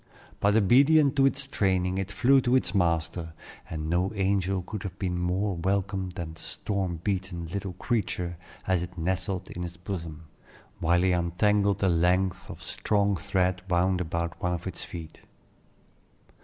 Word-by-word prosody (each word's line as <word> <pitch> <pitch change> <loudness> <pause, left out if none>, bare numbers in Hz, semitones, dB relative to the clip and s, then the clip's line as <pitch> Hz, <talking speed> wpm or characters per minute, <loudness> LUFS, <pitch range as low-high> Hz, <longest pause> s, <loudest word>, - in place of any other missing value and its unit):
But 100 +1 +3
obedient 140 +7 +5
to 135 0 +6
its 140 0 0
training, 95 -7 +1
it 95 +1 -3
flew 130 +6 +4
to 125 +1 +2
its 130 -7 +1
master; 85 -2 0 0.4
and 80 -1 -4
no 90 +4 +1
angel 95 -1 +1
could 105 +2 -6
have 95 -1 -6
been 90 -3 -2
more 95 +3 0
welcome 95 +1 -1
than 80 -2 -5
the 80 - -14
storm 95 -5 -2
beaten 95 -3 -2
little 95 +2 -4
creature 90 -4 -2 0.3
as 95 -2 +2
it 90 +1 -7
nestled 95 +2 -2
in 90 - -6
his 90 0 -5
bosom, 85 -4 -6 0.6
while 85 +2 +3
he 95 - +3
untangled 100 +3 +2
the 95 - +3
lengths 90 +2 +1
of - - -9
strong 100 -1 +1
thread 95 -1 0
wound 90 +1 +2
about 85 0 -3
one 90 0 0
of 85 - -8
its 95 -2 -4
feet. 80 -3 -8
95 Hz, 160 wpm, -27 LUFS, 85-100 Hz, 0.6 s, to